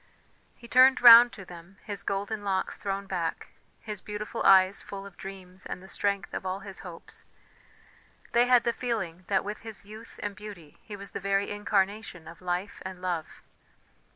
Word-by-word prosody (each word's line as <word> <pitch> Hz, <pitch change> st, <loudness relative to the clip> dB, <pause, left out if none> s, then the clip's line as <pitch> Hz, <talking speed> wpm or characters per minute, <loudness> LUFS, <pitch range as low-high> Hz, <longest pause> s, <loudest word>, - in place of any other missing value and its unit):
He 235 Hz, -, -14 dB
turned 260 Hz, +2 st, +6 dB
round 240 Hz, 0 st, +10 dB
to 195 Hz, -, -10 dB
them, 175 Hz, +2 st, -13 dB
his 205 Hz, -2 st, -5 dB
golden 205 Hz, +2 st, -3 dB
locks 190 Hz, -2 st, -1 dB
thrown 200 Hz, 0 st, -4 dB
back, 175 Hz, -4 st, -3 dB, 0.3 s
his 210 Hz, -3 st, -6 dB
beautiful 210 Hz, 0 st, -5 dB
eyes 190 Hz, 0 st, +5 dB
full 195 Hz, 0 st, -8 dB
of 200 Hz, -2 st, -12 dB
dreams 190 Hz, -1 st, -10 dB
and -, -, -6 dB
the 190 Hz, -, -14 dB
strength 200 Hz, -2 st, -2 dB
of -, -, -4 dB
all 190 Hz, +1 st, -3 dB
his 195 Hz, -1 st, -9 dB
hopes; 175 Hz, -3 st, -10 dB, 1.1 s
they 240 Hz, +1 st, +4 dB
had 245 Hz, -2 st, +5 dB
the 235 Hz, -, +1 dB
feeling 190 Hz, -9 st, -4 dB
that 195 Hz, -1 st, +1 dB
with 210 Hz, +1 st, -5 dB
his 220 Hz, -3 st, -9 dB
youth 215 Hz, +2 st, -12 dB
and 205 Hz, -1 st, -3 dB
beauty 195 Hz, -7 st, -11 dB
he 210 Hz, -, -9 dB
was 200 Hz, 0 st, -9 dB
the -, -, -5 dB
very 195 Hz, +1 st, 0 dB
incarnation 205 Hz, -3 st, -1 dB
of 170 Hz, +2 st, -12 dB
life 180 Hz, +2 st, -3 dB
and 185 Hz, -1 st, -7 dB
love. 175 Hz, -3 st, -4 dB
195 Hz, 180 wpm, -28 LUFS, 185-210 Hz, 1.1 s, round